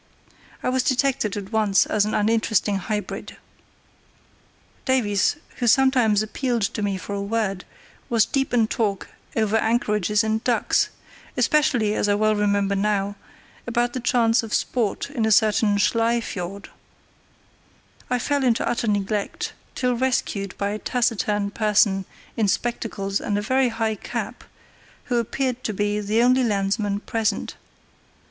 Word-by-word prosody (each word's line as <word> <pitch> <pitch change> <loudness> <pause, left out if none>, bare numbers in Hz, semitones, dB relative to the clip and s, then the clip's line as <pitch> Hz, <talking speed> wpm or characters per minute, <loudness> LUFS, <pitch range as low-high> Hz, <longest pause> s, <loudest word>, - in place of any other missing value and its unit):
I - - +1
was 260 0 +2
detected 260 -5 0
at 200 0 -7
once 215 -3 +3
as 210 -1 +1
an 215 - -2
uninteresting 215 -2 +1
hybrid. 210 +2 -4 1.5
Davies, 215 -6 +2 0.2
who 240 - -1
sometimes 240 -4 +4
appealed 240 +1 -1
to 210 - -2
me 200 -2 -1
for 200 - -6
a 200 - -2
word, 200 -2 -2 0.4
was 230 -3 +3
deep 270 -1 -1
in 235 -2 +3
talk 215 -4 -2 0.3
over 220 -1 +2
anchorages 210 -3 +1
and 220 0 -1
ducks, 245 -2 +2 0.5
especially, 245 -8 +2
as 205 - 0
I 205 - +3
well 215 +1 +2
remember 200 -1 +1
now, 200 0 0 0.5
about 240 0 0
the 255 - -2
chance 235 -1 +3
of 225 -2 -3
sport 240 +2 -1
in 245 -6 -2
a 220 - +2
certain 210 -1 +3
Schlei 230 +3 +2
Fiord. 200 -2 -6 1.4
I 250 - +1
fell 285 +3 0
into 240 -3 +2
utter 235 -1 -1
neglect, 205 0 -1 0.2
till 250 -1 0
rescued 235 -6 -1
by 200 - -1
a 210 +1 -3
taciturn 210 -5 0
person 205 -3 +2 0.3
in 220 -2 +1
spectacles 200 -2 -2
and 205 - -1
a - - 0
very 260 +3 +2
high 225 -1 -1
cap, 210 - -6 0.6
who 245 - -1
appeared 255 +2 -2
to 215 - -1
be 205 +1 0
the 215 +3 +1
only 255 +1 +4
landsman 205 -1 0
present. 220 -3 -1
215 Hz, 145 wpm, -23 LUFS, 205-240 Hz, 1.5 s, sometimes